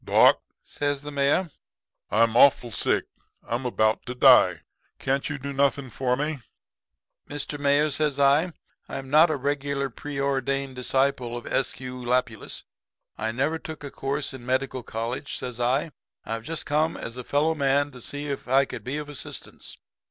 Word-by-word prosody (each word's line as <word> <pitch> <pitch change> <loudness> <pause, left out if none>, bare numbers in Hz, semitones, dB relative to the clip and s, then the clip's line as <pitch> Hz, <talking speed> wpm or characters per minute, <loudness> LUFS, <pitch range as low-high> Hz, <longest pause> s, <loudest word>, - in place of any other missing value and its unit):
"'Doc,' - - +5 0.2
says 145 -1 -2
the 145 - -6
Mayor, 145 +5 +1 0.6
'I'm 115 +1 +3
awful 125 -2 +5
sick. - - +1 0.4
I'm 125 +2 -1
about 110 -2 +1
to 125 - -4
die. 125 - +6 0.4
Can't 135 +1 -1
you 150 - -3
do 140 +1 -5
nothing 140 -1 +1
for 125 +1 0
me?' 150 0 -2 0.9
"'Mr. 145 0 -5
Mayor,' 145 +1 +3
says 145 -1 0
I, 145 +5 +4 0.4
'I'm 135 -1 -6
not 155 +3 +7
a 155 - +1
regular 140 0 -1
preordained 135 0 -2
disciple 125 -1 0
of 120 - -8
S. 135 - 0
Q. 125 0 -7
Lapius. 120 -2 -1 0.6
I 110 - -1
never 145 +7 0
took 160 -2 -8
a 140 - -6
course 140 +1 -3
in 130 - -8
a - - -13
medical 130 0 -1
college,' 115 +4 -4
says 125 -2 -6
I. 130 +6 +1 0.3
'I've 115 0 -3
just 165 +2 -3
come 155 +2 +1
as 115 - -6
a 125 - -6
fellow 150 +5 +2
man 140 -1 +2
to 125 -2 -11
see 145 +4 -4
if 140 -3 -4
I 135 +2 +4
could - - -7
be 135 +4 -3
of 150 -1 -5
assistance.' 145 -2 -7
140 Hz, 170 wpm, -26 LUFS, 125-145 Hz, 0.9 s, not